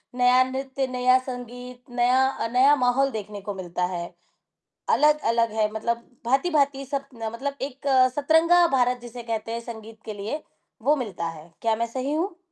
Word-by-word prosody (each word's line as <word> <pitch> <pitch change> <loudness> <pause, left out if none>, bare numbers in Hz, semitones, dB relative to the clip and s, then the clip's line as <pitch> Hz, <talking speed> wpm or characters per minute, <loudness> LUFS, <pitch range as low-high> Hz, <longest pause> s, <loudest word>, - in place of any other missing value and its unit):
नया 250 +1 +5
नृत्य, 265 0 -2
नया 255 0 +3
संगीत, 245 0 -8
नया 250 +2 +3
अ, 230 - -3
नया 270 +4 +6
माहौल 270 +2 +2
देखने 210 -2 -6
को 205 +1 -5
मिलता 180 -2 -4
है, 170 0 -3 0.9
अलग-अलग 235 -7 +3
है 215 -1 +1
मतलब 235 +2 -3 0.2
भाँति-भाँति 275 0 +2
सब 275 +1 -3
ना 225 -1 -4
मतलब 275 +5 -4
एक 275 0 -6 0.3
सतरंगा 325 +4 +5
भारत 250 0 +2
जिसे 240 0 -8
कहते 225 -1 -3
हैं 230 - -3
संगीत 225 -1 -10
के 215 - -6
लिए, 215 +10 -4 0.4
वो 290 +5 +3
मिलता 200 - -3
है। 165 0 -10
क्या 225 -1 +2
मैं 235 - -1
सही 260 +4 -3
हूँ? 340 +4 -2
245 Hz, 170 wpm, -25 LUFS, 225-275 Hz, 0.9 s, नया